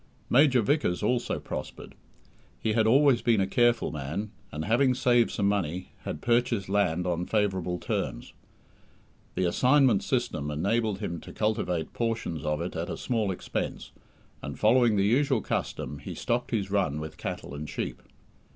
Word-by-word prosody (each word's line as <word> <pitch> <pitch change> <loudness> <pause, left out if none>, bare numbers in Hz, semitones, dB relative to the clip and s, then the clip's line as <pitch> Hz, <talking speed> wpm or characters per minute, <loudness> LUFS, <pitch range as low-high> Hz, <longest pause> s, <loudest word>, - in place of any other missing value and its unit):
Major 130 -2 +5
Vickers 120 - +1
also 120 +3 0
prospered. - - -7 0.7
He 110 - 0
had 110 0 +3
always 135 0 +5
been 115 -3 +3
a 95 - +3
careful 120 +4 +2
man, 80 +8 -4 0.2
and 75 +2 -4
having 125 +4 +3
saved 120 -2 +3
some 100 - 0
money, 90 -3 -1
had 75 - -5
purchased 120 -4 +1
land 90 -4 +1
on 90 0 -1
favourable 95 -5 0
terms. - - -3 1.0
The 95 - 0
"assignment 125 +4 +4
system" 75 +1 -1
enabled 100 +7 0
him 85 -5 -3
to - - -11
cultivate 90 -6 -1
portions 115 - -2
of 75 +1 -1
it 85 - -4
at 85 +1 -3
a - - -4
small 115 -5 -1
expense, 95 - -4 0.5
and, - - -6
following 115 0 +4
the 100 -1 +2
usual 130 +3 +3
custom, 75 - -3
he - - -7
stocked 120 +1 -1
his 100 -4 -2
run 90 -8 +1
with 80 0 -7
cattle - - -5
and 75 +1 -6
sheep. - - -4
105 Hz, 160 wpm, -28 LUFS, 90-120 Hz, 1.0 s, Major